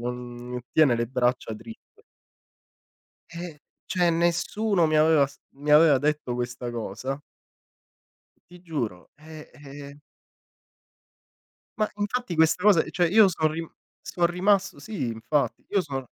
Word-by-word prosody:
non 125 0 -6
tiene 150 -6 +5
le 120 0 -1
braccia 125 -2 -1
dritte.” 225 - -13 1.3
Eh, 170 -3 -7 0.3
cioè 175 -2 +2
nessuno 175 +2 +1
mi 155 - +2
aveva 155 -2 +4
s 140 - -18 0.2
mi 145 +2 -3
aveva 150 -2 +6
detto 150 -3 -1
questa 120 0 -4
cosa. 120 +4 -5 1.3
Ti 180 0 -15
giuro, 120 - -5
eh, 155 +1 -12
eh-eh. 140 0 -11 1.8
Ma 215 -1 0
infatti 210 -1 -3
questa 160 +3 +3
cosa 200 -6 +5
cioè 175 +1 +1
io 210 +3 +6
so' 160 -4 +1
rim 160 +1 -5 0.3
so' 175 - -1
rimasto 190 +3 +1
sì 200 - -4
infatti. 115 +3 -2
Io 200 -2 +2
so 135 -5 -5
155 Hz, 125 wpm, -25 LUFS, 125-175 Hz, 1.8 s, aveva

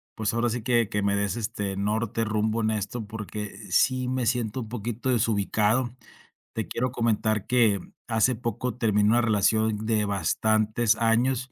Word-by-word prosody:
pues 110 0 -1
ahora 120 +1 +1
sí 115 -1 -3
que 120 -3 +2
que 105 -2 -1
me 100 0 +1
des 100 +3 -1
este 100 -3 -3
norte, 110 +2 -1
rumbo 110 +1 0
en 110 - +1
esto 110 +2 -3
porque, 105 -2 -6
sí 130 +7 +2
me 130 -1 -1
siento 120 0 -1
un 110 - -8
poquito 120 +2 -4
desubicado. 110 +1 +1 0.6
Te 110 - -3
quiero 125 +1 -2
comentar 110 -3 0
que, 115 -5 +3
mm, - - -14 0.2
hace 115 +2 +2
poco 120 +1 -3
terminó 105 -4 +2
una 120 +1 +4
relación 110 -1 +1
de 110 -2 +1
bastantes 110 +2 +1
años, 125 +3 +1
110 Hz, 165 wpm, -26 LUFS, 105-120 Hz, 0.6 s, una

